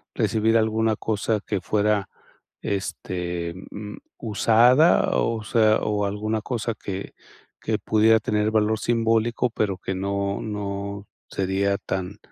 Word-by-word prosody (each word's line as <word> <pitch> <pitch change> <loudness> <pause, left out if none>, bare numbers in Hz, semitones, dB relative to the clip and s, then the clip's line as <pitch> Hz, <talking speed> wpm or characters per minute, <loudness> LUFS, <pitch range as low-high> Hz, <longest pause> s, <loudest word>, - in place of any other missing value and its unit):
recibir 110 +1 +2
alguna 110 0 +1
cosa 110 0 -1
que 100 -4 -2
fuera, 105 0 +1 0.5
este, 90 -3 -3 0.2
mm, 105 0 -7 0.2
usada? 120 - +4
O 115 -2 -1
sea, 110 -1 +3
¿o 105 -1 0
alguna 105 +2 -2
cosa 115 -1 -2
que 100 -2 -6 0.5
que - - 0
pudiera 110 +1 +4
tener 105 0 0
valor 110 0 +2
simbólico, 115 +1 +1
pero 100 -4 -1
que 95 - -4
no 100 +1 -2
no 100 -1 -5 0.2
sería 100 +1 0
tan 95 +2 -4
105 Hz, 120 wpm, -24 LUFS, 100-110 Hz, 0.5 s, usada